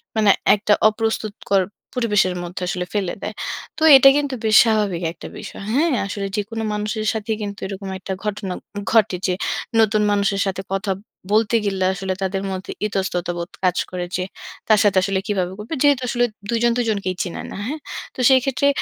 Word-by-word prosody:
মানে 215 Hz, -2 st, +3 dB, 0.3 s
একটা 210 Hz, 0 st, +2 dB, 0.2 s
অপ্রস্তুতকর 215 Hz, -3 st, -1 dB, 0.3 s
পরিবেশের 210 Hz, -6 st, +2 dB
মধ্যে 175 Hz, +1 st, -7 dB
আসলে 180 Hz, -1 st, -2 dB
ফেলে 195 Hz, -4 st, -1 dB
দেয়। 215 Hz, -, -3 dB, 0.4 s
তো 315 Hz, -, -2 dB
এটা 270 Hz, +1 st, +8 dB
কিন্তু 285 Hz, -2 st, -1 dB
বেশ 215 Hz, 0 st, +4 dB
স্বাভাবিক 210 Hz, -6 st, +1 dB
একটা 170 Hz, -, -10 dB
বিষয়। -, -, -8 dB
হ্যাঁ? 315 Hz, +6 st, +3 dB
আসলে 200 Hz, 0 st, -3 dB
যে -, -, +2 dB
কোন 225 Hz, -1 st, -5 dB
মানুষের 215 Hz, +1 st, -2 dB
সাথেই 220 Hz, 0 st, -2 dB
কিন্তু 200 Hz, -1 st, -5 dB
এরকম 195 Hz, 0 st, -6 dB
একটা 190 Hz, +1 st, -4 dB
ঘটনা 205 Hz, -3 st, -3 dB, 0.4 s
ঘটে 220 Hz, -5 st, +3 dB
যে, 185 Hz, -, +1 dB, 0.5 s
নতুন 215 Hz, -1 st, +3 dB
মানুষের 200 Hz, -1 st, +1 dB
সাথে 190 Hz, 0 st, -2 dB
কথা 195 Hz, +1 st, -1 dB, 0.4 s
বলতে 220 Hz, +1 st, +3 dB
গেলে, 195 Hz, -2 st, 0 dB
আসলে 190 Hz, 0 st, -3 dB
তাদের 190 Hz, 0 st, -1 dB
মধ্যে 185 Hz, 0 st, -5 dB, 0.2 s
ইতস্ততাবোধ 180 Hz, -3 st, -2 dB
কাজ 180 Hz, -1 st, +2 dB
করে 180 Hz, -1 st, -3 dB
যে, 185 Hz, -, -1 dB, 0.4 s
তার 215 Hz, -2 st, +5 dB
সাথে 205 Hz, -2 st, +3 dB
আসলে 195 Hz, 0 st, 0 dB
কিভাবে 185 Hz, -3 st, -1 dB
করবে? 215 Hz, +9 st, -6 dB
যেহেতু 285 Hz, -3 st, +4 dB
আসলে 245 Hz, 0 st, +2 dB, 0.2 s
২ 235 Hz, -, +1 dB
জন 240 Hz, -, +4 dB
২ 245 Hz, -, +1 dB
জনকেই 195 Hz, -3 st, -2 dB
চিনে 180 Hz, -, -5 dB
না। -, -, -7 dB
হ্যাঁ? 305 Hz, +4 st, -4 dB, 0.4 s
তো -, -, -11 dB
সেইক্ষেত্রে 265 Hz, +1 st, +3 dB
205 Hz, 180 wpm, -21 LUFS, 190-220 Hz, 0.5 s, এটা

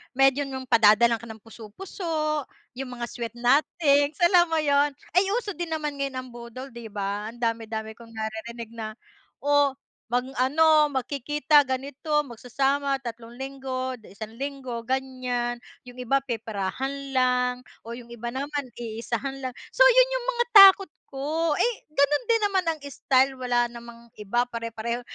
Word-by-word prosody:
medyo 270 Hz, +1 st, +3 dB
yung 265 Hz, -1 st, -5 dB
padadalhan 230 Hz, -1 st, +5 dB
ka 235 Hz, -, -11 dB
ng 220 Hz, -1 st, -11 dB
puso-puso, 305 Hz, -, -4 dB, 0.3 s
yung 255 Hz, -2 st, -5 dB
mga 240 Hz, 0 st, -4 dB
sweet 235 Hz, -1 st, -6 dB
nothings, 285 Hz, +3 st, +3 dB
alam 350 Hz, 0 st, +6 dB
mo 325 Hz, -, -1 dB
'yon. 285 Hz, -1 st, +2 dB, 0.2 s
Ay 365 Hz, +3 st, +3 dB
uso 465 Hz, -4 st, -2 dB
din 345 Hz, -2 st, -5 dB
naman 310 Hz, -2 st, -2 dB
ngayon 275 Hz, -1 st, -2 dB
ang 255 Hz, 0 st, -5 dB
budol 240 Hz, +3 st, -9 dB
'di 235 Hz, -1 st, -9 dB
ba, 205 Hz, 0 st, -3 dB
ang -, -, -15 dB
dami-dami 220 Hz, -1 st, -3 dB
kong 230 Hz, -1 st, -14 dB
naririnig 220 Hz, +1 st, -6 dB
na 215 Hz, -2 st, -6 dB, 0.5 s
oh 285 Hz, -1 st, +3 dB, 0.4 s
mag-ano, 285 Hz, +5 st, +3 dB
magkikita 290 Hz, +3 st, +2 dB
ganito, 285 Hz, +3 st, -1 dB
magsasama 275 Hz, +3 st, -1 dB
tatlong 235 Hz, -1 st, -8 dB
linggo 260 Hz, -1 st, -4 dB
'di 210 Hz, -, -16 dB
isang 220 Hz, 0 st, -7 dB
linggo, 270 Hz, -4 st, -4 dB
ganyan. 255 Hz, -2 st, -2 dB, 0.2 s
Yung 250 Hz, 0 st, -12 dB
iba 270 Hz, +2 st, +1 dB
peperahan 250 Hz, +4 st, -4 dB
lang, 250 Hz, -1 st, +2 dB, 0.3 s
o 230 Hz, -, -9 dB
yung 245 Hz, -1 st, -11 dB
iba 235 Hz, 0 st, -5 dB
naman 280 Hz, -1 st, -4 dB
iisahan 235 Hz, +4 st, -4 dB
lang. 255 Hz, -, -2 dB, 0.2 s
So -, -, +6 dB
yun -, -, +7 dB
yung -, -, -3 dB
mga 480 Hz, 0 st, +1 dB
takot 390 Hz, -3 st, +9 dB, 0.2 s
ko, 305 Hz, +4 st, 0 dB
eh 480 Hz, -1 st, +2 dB, 0.2 s
ganun 285 Hz, -, +2 dB
din 455 Hz, -1 st, +3 dB
naman 385 Hz, -3 st, +1 dB
ang -, -, -23 dB
style, 270 Hz, -1 st, +2 dB
wala 245 Hz, -1 st, +1 dB
namang 235 Hz, 0 st, -12 dB
iba, 240 Hz, +4 st, +1 dB
pare-pareho. 230 Hz, 0 st, -4 dB
260 Hz, 155 wpm, -25 LUFS, 235-290 Hz, 0.5 s, takot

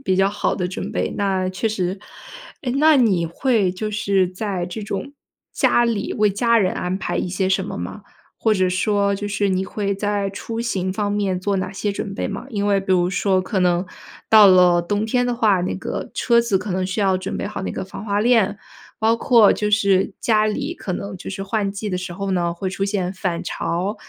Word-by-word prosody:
比 185 Hz, -1 st, +1 dB
较 195 Hz, +1 st, +4 dB
好 205 Hz, -, -1 dB
的 180 Hz, -2 st, -2 dB
准 185 Hz, -, -5 dB
备， -, -, -1 dB
那 190 Hz, -2 st, 0 dB
确 190 Hz, +4 st, -1 dB
实。 190 Hz, -2 st, -2 dB, 0.6 s
诶， 250 Hz, -2 st, -2 dB
那 305 Hz, +2 st, +5 dB
你 200 Hz, -9 st, +3 dB
会 210 Hz, -, +1 dB
就 215 Hz, +3 st, -4 dB
是 200 Hz, -3 st, +1 dB
在 185 Hz, -2 st, -3 dB
这 180 Hz, +5 st, -6 dB
种 215 Hz, +8 st, -5 dB, 0.4 s
家 240 Hz, -, +3 dB
里 225 Hz, -4 st, -1 dB
为 210 Hz, -2 st, +3 dB
家 230 Hz, +3 st, +2 dB
人 185 Hz, -3 st, +1 dB
安 180 Hz, +1 st, -2 dB
排 -, -, -3 dB
一 -, -, -1 dB
些 185 Hz, +1 st, -1 dB
什 190 Hz, 0 st, +1 dB
么 -, -, -6 dB
吗？ 90 Hz, -, -6 dB, 0.3 s
或 220 Hz, -, +1 dB
者 185 Hz, -1 st, +2 dB
说 200 Hz, +2 st, +1 dB
就 205 Hz, +1 st, -4 dB
是 205 Hz, 0 st, 0 dB
你 185 Hz, 0 st, 0 dB
会 200 Hz, 0 st, -2 dB
在 205 Hz, 0 st, -1 dB
出 225 Hz, +3 st, -5 dB
行 190 Hz, -5 st, -1 dB
方 205 Hz, 0 st, -1 dB
面 195 Hz, -3 st, 0 dB
做 200 Hz, +1 st, 0 dB
哪 185 Hz, -, -3 dB
些 205 Hz, +1 st, -2 dB
准 200 Hz, 0 st, -5 dB
备 -, -, -2 dB
吗？ 200 Hz, +5 st, -6 dB
因 205 Hz, -3 st, -1 dB
为 200 Hz, -1 st, +3 dB
比 190 Hz, -, -6 dB
如 180 Hz, -1 st, +3 dB
说 190 Hz, -1 st, +1 dB
可 190 Hz, 0 st, -2 dB
能 180 Hz, 0 st, +2 dB, 0.5 s
到 215 Hz, -2 st, +9 dB
了 180 Hz, -2 st, +6 dB
冬 205 Hz, +5 st, -1 dB
天 245 Hz, +2 st, +1 dB
的 245 Hz, -, 0 dB
话， 210 Hz, -6 st, +3 dB
那 180 Hz, -, -2 dB
个 -, -, -5 dB
车 235 Hz, -2 st, +3 dB
子 230 Hz, -5 st, +1 dB
可 205 Hz, -, -6 dB
能 185 Hz, 0 st, -1 dB
需 190 Hz, +3 st, -2 dB
要 190 Hz, -2 st, +3 dB
准 185 Hz, -, -4 dB
备 -, -, -3 dB
好 210 Hz, -, -5 dB
那 -, -, -3 dB
个 -, -, -4 dB
防 195 Hz, -, -9 dB
滑 205 Hz, -1 st, -1 dB
链， 215 Hz, -3 st, +3 dB, 0.4 s
包 225 Hz, +1 st, +3 dB
括 230 Hz, -3 st, +5 dB
就 210 Hz, 0 st, -1 dB
是 200 Hz, -2 st, +2 dB
家 215 Hz, -2 st, +3 dB
里， 280 Hz, +10 st, -2 dB
可 185 Hz, -, -5 dB
能 200 Hz, +1 st, -5 dB
就 -, -, -8 dB
是 195 Hz, 0 st, -5 dB
换 200 Hz, 0 st, -1 dB
季 205 Hz, +1 st, -5 dB
的 180 Hz, -, -1 dB
时 180 Hz, -1 st, -6 dB
候 195 Hz, 0 st, -3 dB
呢， 170 Hz, -2 st, 0 dB
会 185 Hz, +2 st, -4 dB
出 195 Hz, -, -5 dB
现 195 Hz, -2 st, -1 dB
返 180 Hz, -3 st, -3 dB
潮， 185 Hz, +5 st, -2 dB
200 Hz, 245 characters per minute, -21 LUFS, 185-215 Hz, 0.6 s, 到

